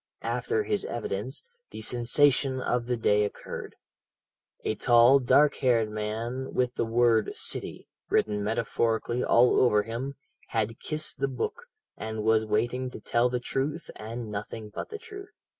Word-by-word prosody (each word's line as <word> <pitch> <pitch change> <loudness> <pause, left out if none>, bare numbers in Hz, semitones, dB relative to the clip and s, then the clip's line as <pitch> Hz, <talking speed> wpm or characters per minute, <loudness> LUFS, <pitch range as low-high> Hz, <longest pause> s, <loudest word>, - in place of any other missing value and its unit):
"After 445 -1 0
his 420 -1 -1
evidence, 470 - -3 0.3
the 110 - -8
sensation 130 +3 +3
of 120 -1 -1
the 125 -1 0
day 105 -2 +3
occurred. 105 - -6 0.9
A - - 0
tall, 120 +4 +6
dark 140 +3 +4
haired 115 -5 +2
man, 115 +5 -4
with 125 -1 +1
the - - -1
word 115 -2 +3
'City' - - -4 0.2
written 105 -1 +1
metaphorically 115 +2 0
all 120 +1 +5
over 105 -5 +4
him, 120 +5 -5 0.3
had 115 0 -2
kissed 155 0 -3
the 135 - +1
book, 135 - -4 0.3
and 110 -1 -4
was 110 0 +3
waiting 120 +4 0
to - - -9
tell 120 +1 +1
the 125 0 -1
truth, 140 +6 -3
and 115 0 -6
nothing 105 +1 -6
but - - -5
the 435 - -6
truth. 405 -3 -11
120 Hz, 150 wpm, -28 LUFS, 110-130 Hz, 0.9 s, tall